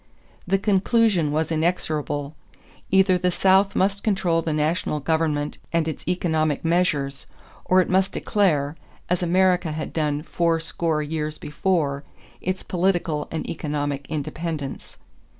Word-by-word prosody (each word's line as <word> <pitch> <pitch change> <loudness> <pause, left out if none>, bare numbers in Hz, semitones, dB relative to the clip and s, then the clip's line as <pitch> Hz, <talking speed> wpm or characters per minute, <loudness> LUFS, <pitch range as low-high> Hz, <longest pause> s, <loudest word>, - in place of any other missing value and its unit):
'" - - -31
The 195 +2 +3
conclusion 200 -4 +2
was 155 +1 0
inexorable: 155 -3 -1 0.5
either 190 -1 +4
the 180 0 +2
South 190 +2 +3
must 200 +1 +1
control 180 -6 +1
the 165 - -2
national 150 0 0
government 150 -1 0
and 165 -1 +1
its 160 - -5
economic 160 -4 0
measures, 150 -5 0 0.4
or 185 0 +5
it - - -1
must 190 +1 +2
declare, 155 -8 +1 0.4
as 180 - +2
America 180 -1 +2
had 155 0 -5
done 150 -2 -1
four 165 0 +1
score 160 -1 -1
years 155 0 -3
before, 150 -3 -1 0.4
its 185 +1 -2
political 175 -4 0
and 160 - -4
economic 145 -3 -3
independence. 155 -1 -4
165 Hz, 135 wpm, -23 LUFS, 150-185 Hz, 0.5 s, or